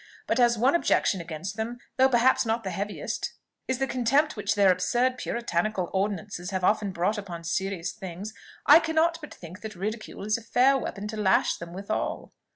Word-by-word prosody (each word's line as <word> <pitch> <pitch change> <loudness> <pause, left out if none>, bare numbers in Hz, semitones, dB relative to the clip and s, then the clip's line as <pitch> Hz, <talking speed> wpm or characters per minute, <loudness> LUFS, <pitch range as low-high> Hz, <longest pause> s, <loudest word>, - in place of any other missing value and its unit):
But 230 - 0
as 240 -1 +4
one 255 +5 +3
objection 210 - +2
against 170 +5 -6
them, 230 +2 -3 0.2
though 265 0 +5
perhaps 250 +1 +4
not 225 0 -1
the 190 - -3
heaviest, 205 +1 -4 0.3
is 260 - 0
the 270 - 0
contempt 270 +4 +1
which 210 0 -1
their 200 -2 +5
absurd 250 +7 +1
puritanical 215 -4 -1
ordinances 195 -2 -2
have 185 -2 -3
often 205 +1 +2
brought 185 +5 0
upon 175 -4 -7
serious 185 +1 -2
things, 190 +3 -7 0.3
I - - +9
cannot 330 0 +1
but 300 - -9
think 180 +3 -11
that 220 -1 -7
ridicule 215 +3 -5
is 215 +2 +1
a - - -14
fair 255 +4 +3
weapon 210 -6 -4
to 220 - -5
lash 200 -3 +3
them 170 0 -8
withal." 200 +4 -4
210 Hz, 185 wpm, -27 LUFS, 190-240 Hz, 0.3 s, I